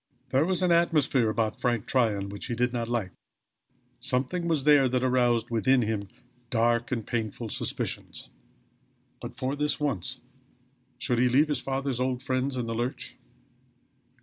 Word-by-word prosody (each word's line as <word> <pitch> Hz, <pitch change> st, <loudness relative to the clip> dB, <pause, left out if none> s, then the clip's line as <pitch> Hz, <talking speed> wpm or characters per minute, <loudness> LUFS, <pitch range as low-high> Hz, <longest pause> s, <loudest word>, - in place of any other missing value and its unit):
There 135 Hz, +4 st, +3 dB
was 185 Hz, 0 st, 0 dB
an 180 Hz, -, +3 dB
atmosphere 150 Hz, -8 st, +3 dB
about 110 Hz, -1 st, -1 dB
Frank 120 Hz, -4 st, 0 dB
Tryon 105 Hz, -6 st, +1 dB
which 100 Hz, 0 st, -6 dB
he 120 Hz, -, -2 dB
did 125 Hz, +1 st, 0 dB
not 115 Hz, -1 st, -2 dB
like; 115 Hz, -6 st, -2 dB, 0.9 s
something 155 Hz, +8 st, -1 dB
was 160 Hz, -5 st, +1 dB
there 145 Hz, -3 st, +5 dB
that 125 Hz, 0 st, 0 dB
aroused 120 Hz, -2 st, +2 dB
within 125 Hz, +3 st, +3 dB
him 105 Hz, -2 st, -2 dB, 0.4 s
dark 115 Hz, 0 st, +1 dB
and 115 Hz, -4 st, -2 dB
painful 115 Hz, -1 st, -3 dB
suspicions. -, -, -4 dB, 0.9 s
But -, -, -8 dB
for 130 Hz, +2 st, -2 dB
this 150 Hz, 0 st, -1 dB
once 130 Hz, -, -1 dB, 0.8 s
should 120 Hz, -1 st, 0 dB
he 125 Hz, 0 st, +4 dB
leave 145 Hz, +5 st, +4 dB
his 150 Hz, -, 0 dB
father's 135 Hz, -1 st, -2 dB
old 125 Hz, 0 st, -1 dB
friends 130 Hz, +1 st, -1 dB
in 125 Hz, -, -1 dB
the 115 Hz, -, -3 dB
lurch? 120 Hz, +3 st, -4 dB
125 Hz, 155 wpm, -27 LUFS, 115-135 Hz, 0.9 s, there